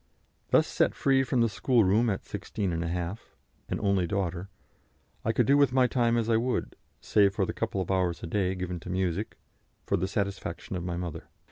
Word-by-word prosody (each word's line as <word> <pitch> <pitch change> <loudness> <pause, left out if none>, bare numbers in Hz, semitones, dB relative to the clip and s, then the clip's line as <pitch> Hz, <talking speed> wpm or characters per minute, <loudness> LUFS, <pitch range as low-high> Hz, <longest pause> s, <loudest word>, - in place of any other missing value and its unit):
Thus - - +5
set - - +1
free 135 -1 +3
from 130 -1 +1
the 115 - +4
schoolroom 115 0 +3
at 95 - -2
16½, 85 0 -3 0.5
an - - -2
only 100 -3 +1
daughter, 95 -1 -2 0.7
I 115 - +1
could 120 +1 +2
do 140 +4 +4
with 140 -3 +4
my 130 -1 +5
time 120 -2 +2
as 115 -1 0
I 115 -1 +3
would, 125 +2 -1 0.3
save 100 -2 +3
for - - +1
the - - -4
couple 95 - -2
of 95 - -3
hours 90 -3 0
a - - -2
day 95 +2 0
given 90 -1 -4
to 90 - -10
music, 95 +2 -2 0.5
for 100 - +1
the 95 +2 -1
satisfaction 100 -3 -3
of 90 - -3
my 90 -1 -3
mother. 85 -3 -5
100 Hz, 195 wpm, -28 LUFS, 90-115 Hz, 0.7 s, Thus